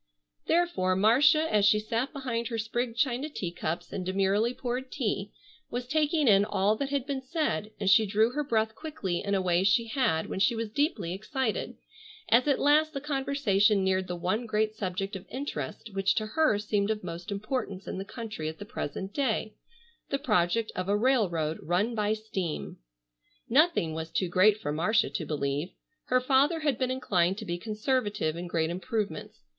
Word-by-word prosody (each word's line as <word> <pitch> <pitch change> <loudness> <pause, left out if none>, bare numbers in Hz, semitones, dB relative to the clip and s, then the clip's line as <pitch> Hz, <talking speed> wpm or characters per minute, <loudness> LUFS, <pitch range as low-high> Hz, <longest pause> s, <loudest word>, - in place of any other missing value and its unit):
Therefore, 330 - +2
Marcia 270 - +5
as 210 -1 +4
she 205 +1 +5
sat 230 +5 -2
behind 245 -5 -3
her 230 - -3
sprigged 230 +2 -2
china 265 +2 0
teacups 175 - -4
and 185 - -3
demurely 195 +5 +1
poured 250 +1 -4
tea, 205 -6 -2 0.4
was 245 +1 -3
taking 305 +1 +1
in 200 -2 +6
all 205 0 +1
that 275 +2 -2
had 280 -2 -1
been 280 -2 -3
said, 260 - -2
and 200 - -2
she 215 +3 +6
drew 215 +4 +3
her 295 +3 -1
breath 220 -4 0
quickly 225 - -4
in 200 0 0
a 190 - +1
way 180 0 +2
she 200 +4 +3
had 220 - 0
when - - -4
she 200 +5 +3
was 225 -1 -3
deeply 225 - 0
excited, 220 +4 -3 0.5
as 240 +5 +5
at 280 - +3
last 305 +2 +3
the - - -1
conversation 265 -8 +2
neared 190 0 +1
the 180 - -3
one 190 +7 -1
great 215 0 0
subject 195 0 -3
of 190 0 -8
interest 230 - -5
which 195 0 +1
to 215 - 0
her 305 -1 +2
seemed 205 0 0
of 215 -2 -2
most 175 +2 -6
importance 200 -1 -3
in - - -4
the - - -3
country 220 -7 -5
at 160 - -8
the 205 - -8
present 190 +1 -5
day, 220 -5 -1 0.6
the 275 - 0
project 215 - +1
of 185 +1 -3
a 205 - +3
railroad 190 - +1
run 190 +8 0
by 210 -2 0
steam. 195 -7 -4 0.7
Nothing 265 - +3
was 160 0 -4
too 185 +1 -1
great 200 +4 +5
for 145 - -3
Marcia 195 +9 +2
to 165 - -3
believe. 145 +2 -2 0.4
Her 255 - +3
father 275 +5 +2
had 285 -6 0
been 255 -1 0
inclined 195 -8 +1
to - - -6
be 175 0 -3
conservative 210 - -1
in 175 +1 -5
great 165 -1 0
improvements. 185 - -4
215 Hz, 185 wpm, -28 LUFS, 185-255 Hz, 0.7 s, in